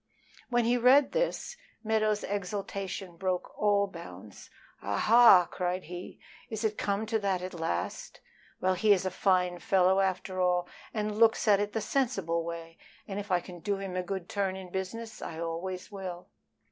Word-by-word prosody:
When 240 -1 +2
he 240 +1 +3
read 265 +4 +6
this, - - -1 0.3
Meadows' 215 -1 +1
exultation 195 -2 -4
broke 185 0 -2
all 205 -1 +3
bounds. 105 - -11 0.3
"Ah 100 0 -2
ha!" 225 -6 +7
cried 180 0 -2
he, 175 +2 -8 0.3
"is 220 0 -4
it 215 -1 +1
come 200 +1 -1
to 220 0 0
that 190 -3 -1
at 185 - -5
last? 90 - -3 0.4
Well, 185 0 +2
he 205 +3 +4
is 190 -1 0
a 185 - -1
fine 180 -1 +1
fellow 190 +1 +3
after 185 -1 -1
all, 180 -1 +2 0.2
and 210 -1 -2
looks 225 0 +4
at 200 -2 +6
it 205 0 -2
the 225 - -1
sensible 195 -11 0
way, 165 0 -7 0.3
and 195 0 -4
if 205 0 -7
I 180 -1 +2
can 175 -1 -10
do 200 +3 -1
him 195 -2 -5
a 185 - 0
good 185 -1 -5
turn 195 -2 -1
in 185 -2 -9
business 220 +4 -5
I 160 - -6
always 175 +3 -4
will." 185 -3 -7
190 Hz, 175 wpm, -29 LUFS, 180-210 Hz, 0.4 s, ha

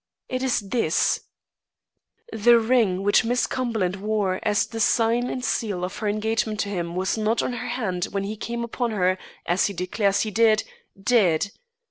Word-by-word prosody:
It 255 0 -3
is 260 -4 +1
this: 200 -5 0 1.1
"The 235 +2 +5
ring 220 -5 +2
which 205 +2 +4
Miss 245 +2 +1
Cumberland 220 -8 -1
wore 205 -2 -1
as 210 -1 +1
the 225 - -7
sign 230 +2 +2
and 255 -1 -3
seal 205 -6 -1
of 185 +2 -4
her 215 - -2
engagement 215 +1 -1
to 200 - -3
him 175 -3 -3
was 190 +4 -1
not 220 +2 +1
on 250 - -2
her 245 +1 -5
hand 215 -8 -2
when 195 0 -3
he 205 +2 -4
came 235 +2 -4
upon 235 +1 -2
her, 185 -3 +1 0.3
as 175 +3 +2
he 200 - -5
declares 195 +2 0
he 215 - -2
did, 220 0 +4 0.4
dead. 200 -4 +2
215 Hz, 175 wpm, -24 LUFS, 195-235 Hz, 1.1 s, The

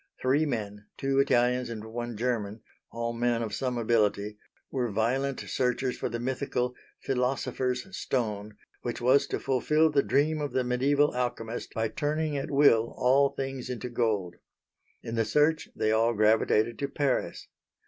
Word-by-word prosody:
Three 140 +5 +2
men 105 -5 -4
two 135 0 +1
Italians 125 -2 +2
and 110 -2 -6
one 120 0 -5
German, 110 -3 -2 0.3
all 115 0 -3
men 120 0 0
of 110 -2 -5
some 125 0 -2
ability 105 -2 +1 0.3
were 125 -3 -1
violent 130 +6 0
searchers 125 0 -1
for - - -3
the 120 - -4
mythical 125 0 -2 0.3
"philosopher's 125 -1 -1
stone" 105 - -2 0.2
which 120 - -4
was 130 +3 +4
to - - -2
fulfil 150 +4 +2
the 145 -1 +4
dream 150 +3 +1
of 145 - -3
the 130 - +1
mediæval 140 +4 +2
alchemist 120 -2 -3
by 115 0 +1
turning 150 +5 -1
at 140 - -3
will 140 -6 +4
all 135 +3 +4
things 135 -2 -5
into 125 0 -4
gold. 105 -7 -1 0.7
In 115 - -5
the 115 -1 +2
search 150 +6 +2
they 110 - +1
all 115 +1 +2
gravitated 110 +1 +3
to 140 - -1
Paris. 140 -1 -1
125 Hz, 155 wpm, -28 LUFS, 115-135 Hz, 0.7 s, was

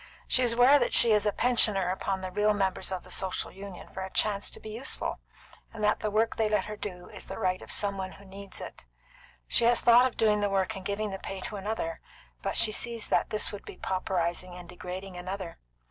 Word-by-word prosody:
She 255 - +2
is 240 -2 +3
aware 250 +5 +6
that - - 0
she 235 - +6
is 210 0 +4
a - - +3
pensioner 210 -5 +3
upon 190 0 -2
the 185 0 -5
real 210 +2 +2
members 190 -1 0
of 185 -1 -3
the - - -12
Social 190 -1 -2
Union 195 -1 -9
for 190 - -7
a 190 - -4
chance 200 +1 +1
to - - -9
be 215 - -8
useful, 235 +5 -2 0.5
and 220 -2 -7
that 210 0 +3
the 215 - -1
work 220 +2 +1
they 220 -1 +2
let 210 - +1
her 210 - -6
do 180 -4 -7
is - - -8
the - - -6
right 185 0 0
of - - -11
some 200 -1 +1
one 190 0 -4
who 200 - -15
needs 195 0 -7
it. - - -9 0.6
She 235 - +3
has 240 0 +5
thought 240 +1 +7
of 255 - -9
doing 210 -1 +3
the 205 0 +1
work 195 +2 0
and 190 - -7
giving 205 +2 -2
the 195 - -5
pay 195 - -6
to 210 - -6
another; 195 -5 -3 0.4
but - - -2
she 215 - +5
sees 230 +1 -1
that - - +2
this 215 - 0
would 205 - -8
be - - -10
pauperising 180 -1 -1
and 180 -1 -10
degrading 180 +1 -7
another. 185 -1 -6
200 Hz, 240 wpm, -29 LUFS, 185-215 Hz, 0.6 s, thought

